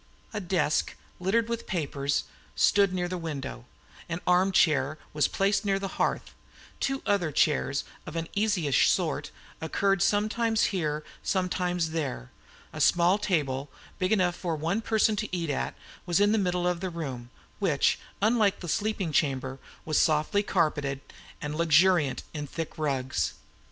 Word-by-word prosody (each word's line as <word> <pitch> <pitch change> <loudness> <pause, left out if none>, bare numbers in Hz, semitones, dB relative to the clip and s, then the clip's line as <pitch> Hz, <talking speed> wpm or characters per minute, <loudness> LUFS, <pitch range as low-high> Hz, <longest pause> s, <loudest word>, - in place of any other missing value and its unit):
A 210 - -2
desk, 170 -6 0 0.2
littered 215 +6 +1
with 235 0 -4
papers, 140 -5 -1 0.3
stood 200 -1 +4
in 180 -1 -1
the 180 0 -4
window; 140 -7 -5 0.4
an 165 +1 -2
arm 180 +2 +4
chair 155 -5 +3 0.2
was 150 -1 +3
placed 195 +1 +1
near 195 -2 +1
the 195 0 -4
hearth; - - -1 0.5
two 270 0 -1
other 200 -7 +1
chairs 140 -2 +1 0.2
of 155 - -7
an 165 0 -2
easyish 200 - +2
sort - - 0 0.3
occurred, 195 +4 +1
sometimes 220 +3 +2
here, 155 -4 -1 0.2
sometimes 180 -3 0
there; 135 - -3 0.4
a - - -4
small 175 +3 +4
table, 145 -8 -1 0.3
big 185 +2 0
enough 180 -5 +2
for 170 -3 -2
one 165 +8 -1
person 220 -1 +2
to 215 +1 -2
eat 170 -4 -1
at, 140 - -2 0.3
was 175 +1 +2
in 205 0 +4
the 220 - +3
middle 180 -2 0
of 180 -1 0
the 185 +1 -3
room, 135 -8 -6 0.3
which, 170 -9 +2 0.2
unlike 215 -2 +3
the 175 - -6
sleeping 200 -1 -1
chamber, 135 -2 0 0.3
was 155 -1 +2
softly 155 +5 +2
carpeted 150 -8 0 0.4
and 150 0 -3
luxuriant 165 -2 +3
in 150 -2 -4
thick 165 +3 -5
rugs. 135 -4 -1
175 Hz, 150 wpm, -28 LUFS, 150-195 Hz, 0.5 s, stood